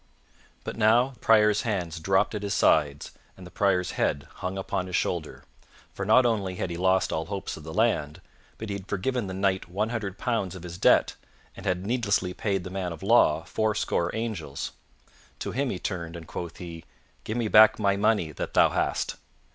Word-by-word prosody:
But - - -6
now 115 +4 +4
the 130 - -17
Prior's 105 -2 +4
hands 90 -7 -2
dropped 95 +6 +2
at 105 - -3
his 100 -1 -2
sides 75 -2 +2 0.3
and 95 - -11
the 90 - -12
Prior's 95 -3 +1
head 70 -1 -1
hung 95 +1 -4
upon 95 -1 -2
his 90 - -3
shoulder, 80 -4 -2 0.5
for 95 - -4
not 125 +4 +6
only 100 -6 0
had 90 - -3
he - - -3
lost 95 +2 +2
all 80 0 -2
hopes 100 -1 -4
of 80 - -11
the 80 - -7
land, 80 -7 0 0.4
but 110 - -6
he - - -2
had 100 -1 -7
forgiven 110 +3 -1
the 95 - -5
Knight 95 -2 0
one 105 +5 -1
hundred 105 -5 -4
pounds 110 -7 -1
of 90 - -9
his 90 0 -8
debt - - +4 0.4
and 95 - -8
had 90 0 -1
needlessly 100 -5 0
paid 100 -3 -1
the 95 - -7
man 95 -2 -3
of 85 +3 -8
law 95 -8 +4
fourscore 105 -5 0
angels. 100 -12 -4 0.7
To - - -4
him 135 +2 -1
he 95 - -3
turned, 85 -3 -4
and 85 -1 -8
quoth 85 +1 -7
he, 85 -2 -8 0.4
"Give 110 - -3
me 115 -2 0
back 110 +1 +7
my 100 -2 +2
money 100 -5 +1
that - - -6
thou - - +6
hast." - - -1
95 Hz, 200 wpm, -27 LUFS, 90-110 Hz, 0.7 s, back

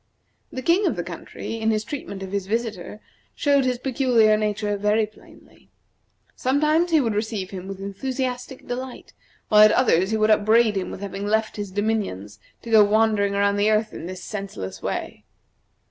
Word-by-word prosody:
The 260 - -6
king 355 +7 +3
of - - 0
the - - -3
country, 225 - -7
in 220 0 0
his 215 -1 +1
treatment 210 -8 -6
of 190 - -7
his 200 -2 -2
visitor, 215 -2 -3 0.3
showed 280 -2 +2
his 250 -1 0
peculiar 245 -4 +3
nature 210 -1 -1
very 210 +2 +2
plainly. 215 - -20 0.7
Sometimes 305 +6 +2
he 320 -2 +4
would 230 -6 0
receive 210 -2 -3
him 190 -1 -7
with 195 -1 -7
enthusiastic 250 +6 -4
delight, 250 +1 -6 0.4
while 210 0 +6
at 215 0 +8
others 190 -7 +3
he 220 - 0
would 215 0 +3
upbraid 215 +1 +4
him 190 - -2
with - - -8
having 200 0 -5
left 220 +1 0
his 205 -2 -5
dominions 195 - -2 0.2
to 230 - -7
go 220 -1 +8
wandering 205 -1 +2
around 200 0 +2
the 205 +1 +3
earth 215 0 +1
in 170 - -7
this 185 0 -7
senseless 100 - -6
way. - - -4
215 Hz, 175 wpm, -23 LUFS, 200-240 Hz, 0.7 s, at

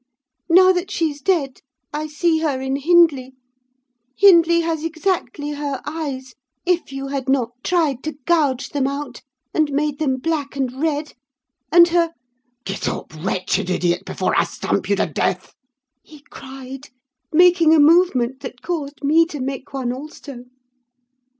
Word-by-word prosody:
Now 370 +2 +7
that 360 +1 -2
she's 315 -7 -2
dead, 280 -5 0 0.3
I 305 +1 -3
see 320 +2 +1
her 295 -5 -1
in 265 +1 -2
Hindley: 290 -4 +3 0.8
Hindley 340 -4 +6
has 325 -2 -2
exactly 320 -4 -2
her 285 -2 -4
eyes, 280 -5 -5 0.3
if 355 -5 0
you 275 0 -5
had 270 -2 -3
not 255 -4 +1
tried 310 -8 0
to 310 - -3
gouge 285 -6 +1
them 275 -2 -1
out, 280 -2 -5 0.3
and 310 -2 +1
made 290 0 -1
them 270 -4 0
black 290 -1 -3
and 265 -1 -3
red; 305 -2 -1 0.6
and 345 0 +7
her—' 335 -1 +1 0.5
"'Get 195 - -3
up, - - -6
wretched 185 +2 -2
idiot, 175 0 0
before - - -2
I - - +3
stamp - - -3
you - - +3
to - - +1
death!' - - -2 0.5
he 300 -2 -17
cried, 270 +1 -10 0.4
making 340 -1 +5
a - - +4
movement 290 -6 +3
that 260 -3 -9
caused 300 -5 -5
me 320 +4 +4
to 300 -3 -7
make 265 0 -5
one 255 -3 -3
also. 275 -2 -10
290 Hz, 150 wpm, -20 LUFS, 265-330 Hz, 0.8 s, Now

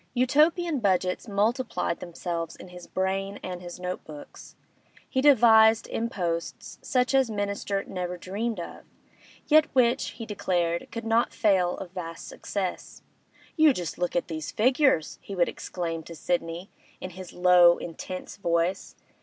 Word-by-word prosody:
Utopian 300 +5 +3
budgets 185 -1 0
multiplied 215 -2 0
themselves 170 -1 -5
in 185 - -12
his 180 -1 -11
brain 195 +1 -2
and 180 -1 -5
his 175 0 -9
note 180 0 -4
books. 150 -2 -12 0.5
He 260 - 0
devised 225 -5 +6
imposts 175 -7 -3
such 255 +1 +1
as 265 -3 +3
Minister 200 -1 -2
never 180 -1 -4
dreamt 205 +4 -3
of, 170 - -8 0.6
yet 310 0 +5
which, 250 0 +2
he 230 - -6
declared, 175 -5 -1
could 230 0 -6
not 225 +1 +2
fail 185 -4 +2
of 180 - -8
vast 165 -3 -7
success. 190 -3 -5 0.5
'You 310 -3 +6
just 175 -7 -5
look 180 0 -1
at 175 - 0
these 155 -2 -5
figures!' 255 - +2
he 200 - -7
would 175 -2 +3
exclaim 165 -2 -4
to 170 - -9
Sidney, 170 +2 -3 0.3
in 185 - -6
his 185 0 -10
low, 180 -1 +6
intense 180 +2 -7
voice. 170 -1 -1
190 Hz, 145 wpm, -27 LUFS, 175-230 Hz, 0.6 s, devised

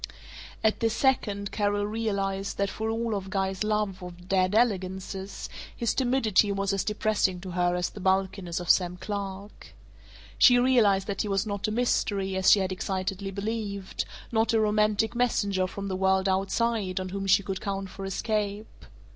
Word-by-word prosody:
At 220 -1 +2
this 225 -1 +1
second 205 -7 +1
Carol 205 -1 0
realized 200 -3 -2
that 200 0 0
for 220 0 -3
all 225 -2 -1
Guy's 190 0 -2
love 210 -3 -1
of 180 0 -10
dead 185 +1 +2
elegances 190 -3 -1 0.3
his 235 -3 0
timidity 240 -6 +2
was 195 0 -1
as 195 - 0
depressing 210 -3 0
to 185 -1 -7
her 175 0 +1
as 180 0 -1
the - - -10
bulkiness 190 -2 0
of 175 - -7
Sam 180 -1 +1
Clark. 200 0 -6 0.6
She 245 -2 +7
realized 230 -6 +4
that 200 -1 -2
he - - -2
was 195 +1 0
not 205 -1 -2
a - - -2
mystery, 205 -4 0
as 190 0 +3
she 205 - +7
had 190 0 -1
excitedly 190 +1 -3
believed; 200 -1 -4 0.3
not 225 0 +2
a 225 - +4
romantic 215 +1 +2
messenger 205 -6 +1
from 200 +1 -6
the 190 - -2
World 190 0 +2
Outside 195 0 0
on 185 0 -4
whom 195 +1 -4
she 195 +1 +5
could 190 -1 -4
count 195 -1 -4
for 195 - -8
escape. 205 +1 -3
200 Hz, 170 wpm, -27 LUFS, 190-215 Hz, 0.6 s, She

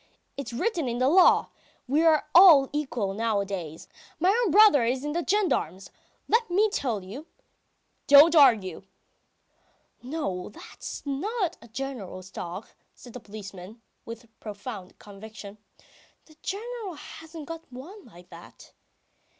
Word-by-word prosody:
It's 275 -5 -6
written 330 - -2
in 240 0 -3
the 255 +1 +1
law.... 360 +6 +5 0.4
We 290 +5 +2
are 320 -2 +3
all 330 -7 +7
equal 245 -9 -2
nowadays. 200 -7 -3 0.3
My 355 +3 +3
own 460 0 +1
brother 405 - +6
is 255 +4 -1
in 295 - -2
the 340 +3 -2
gendarmes... 320 - -1 0.4
let 460 -1 +1
me 410 +4 +2
tell 235 - -2
you... 250 - -10 0.4
." - - -47
"Don't 295 +4 +8
argue!" 225 - +4 1.2
"No, 245 - -4
that's 210 - -10
not 365 - -3
the 235 - -15
General's 220 -7 -7
dog," 180 +5 -7 0.3
says 245 - -14
the 250 - -8
policeman, 200 -1 -11 0.2
with 230 +1 -10
profound 205 -2 -9
conviction, 210 0 -12 0.7
"the 310 - -20
General 430 -2 -6
hasn't 320 +1 -11
got 330 -1 -10
one 340 +12 -11
like 180 -5 -17
that. - - -15
260 Hz, 135 wpm, -26 LUFS, 205-330 Hz, 1.2 s, Don't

